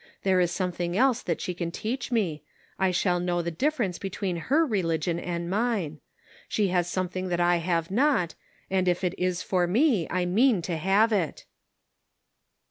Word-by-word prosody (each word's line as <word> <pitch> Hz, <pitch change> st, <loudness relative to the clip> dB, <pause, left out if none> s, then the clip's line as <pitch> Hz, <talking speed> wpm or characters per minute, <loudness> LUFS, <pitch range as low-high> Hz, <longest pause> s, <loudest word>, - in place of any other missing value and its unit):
There 190 Hz, -1 st, +3 dB
is 175 Hz, -1 st, +3 dB
something 175 Hz, -1 st, -2 dB
else 255 Hz, 0 st, +3 dB
that 170 Hz, -, -2 dB
she 180 Hz, -, -3 dB
can 170 Hz, -1 st, -3 dB
teach 235 Hz, +9 st, -4 dB
me; 185 Hz, -10 st, 0 dB, 0.4 s
I 190 Hz, -1 st, +3 dB
shall 180 Hz, 0 st, +1 dB
know 175 Hz, -1 st, -1 dB
the 170 Hz, -, -2 dB
difference 230 Hz, -, -1 dB
between 190 Hz, -2 st, -3 dB
her 315 Hz, +4 st, +4 dB
religion 170 Hz, -, 0 dB
and 170 Hz, -1 st, -3 dB
mine. 195 Hz, -6 st, -1 dB, 0.5 s
She 205 Hz, -3 st, +1 dB
has 175 Hz, -1 st, +1 dB
something 185 Hz, 0 st, -2 dB
that 175 Hz, -1 st, -1 dB
I 175 Hz, 0 st, +3 dB
have 170 Hz, 0 st, -1 dB
not, 230 Hz, -, +2 dB, 0.3 s
and, 185 Hz, -1 st, 0 dB
if 180 Hz, +1 st, +1 dB
it 180 Hz, -1 st, +1 dB
is 180 Hz, -1 st, 0 dB
for 180 Hz, -2 st, +1 dB
me, 225 Hz, -, +2 dB
I 180 Hz, 0 st, 0 dB
mean 210 Hz, +1 st, +3 dB
to 170 Hz, 0 st, -2 dB
have 200 Hz, +7 st, +3 dB
it." 180 Hz, -7 st, -1 dB
180 Hz, 175 wpm, -27 LUFS, 175-205 Hz, 0.5 s, her